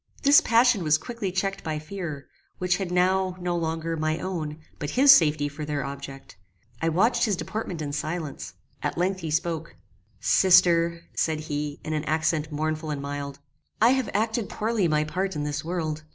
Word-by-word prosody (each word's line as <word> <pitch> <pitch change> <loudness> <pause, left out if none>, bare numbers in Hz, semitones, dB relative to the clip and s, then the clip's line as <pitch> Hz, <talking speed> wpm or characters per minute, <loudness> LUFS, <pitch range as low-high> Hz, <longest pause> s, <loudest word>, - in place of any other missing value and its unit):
This 285 +1 +7
passion 230 -4 +4
was 155 -1 +4
quickly 205 +3 -5
checked 195 +2 -2
by 155 -1 -2
fear, 155 -3 -6 0.3
which 180 -1 +1
had 190 -3 -4
now, 185 +1 +2
no 175 -1 -1
longer, 165 0 -2
my 155 0 -1
own, 165 -5 -4 0.2
but 145 - -3
his 270 +2 +7
safety 150 - +5
for 145 +1 -7
their 145 -3 -2
object. 140 -4 -8 0.4
I 165 - +2
watched 225 +8 +2
his 210 -3 +1
deportment 185 -4 -4
in 145 -1 -4
silence. 155 0 -4 0.3
At - - -2
length 185 +2 0
he 165 -3 -5
spoke: 160 +1 -2 0.4
"Sister," 170 -2 +4
said 160 -1 0
he, 145 -1 -4
in 155 - -2
an 155 0 -2
accent 155 0 0
mournful 155 +1 -2
and 145 -2 -2
mild, 140 0 -5 0.4
"I 230 - +6
have 265 -2 0
acted 220 0 -1
poorly 215 -4 0
my 150 -1 +2
part 185 +5 -2
in 150 - -2
this 150 0 -3
world. 160 -2 -3
165 Hz, 180 wpm, -26 LUFS, 150-190 Hz, 0.4 s, This